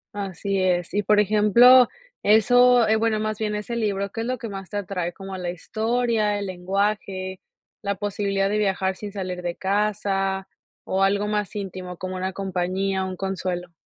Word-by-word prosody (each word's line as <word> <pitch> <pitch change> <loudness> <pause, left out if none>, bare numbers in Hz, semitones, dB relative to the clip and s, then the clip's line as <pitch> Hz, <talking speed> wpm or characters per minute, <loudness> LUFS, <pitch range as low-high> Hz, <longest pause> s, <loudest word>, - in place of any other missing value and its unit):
Así 195 0 -2
es, 180 -2 0
y 205 - +2
por 210 +1 +3
ejemplo 215 +5 +6 0.3
eso 245 +3 +5
eh, 220 +1 +3
bueno, 220 -1 +1
más 215 -1 -2
bien 210 -1 -1
ese 210 +3 -4
libro, 200 -3 -1
¿qué 225 - -4
es 230 - -3
lo 255 0 -1
que 230 - -6
más 195 -3 -7
te 205 - -4
atrae? 180 -3 -3
¿Como 195 +1 -8
la 180 -1 -3
historia, 220 +3 0
el 205 - -3
lenguaje, 190 0 -2 0.4
la 200 -1 -1
posibilidad 200 0 -1
de 210 +1 0
viajar 190 -2 0
sin 205 +1 -7
salir 185 -3 -4
de 175 -1 -3
casa, 195 -1 -1 0.4
o 190 - -1
algo 200 +1 +2
más 210 -2 -2
íntimo, 185 -3 -6
como 185 +1 -5
una 185 +1 -2
compañía, 190 0 -1
un 185 0 -4
consuelo? 180 -2 -3
195 Hz, 175 wpm, -24 LUFS, 190-210 Hz, 0.4 s, ejemplo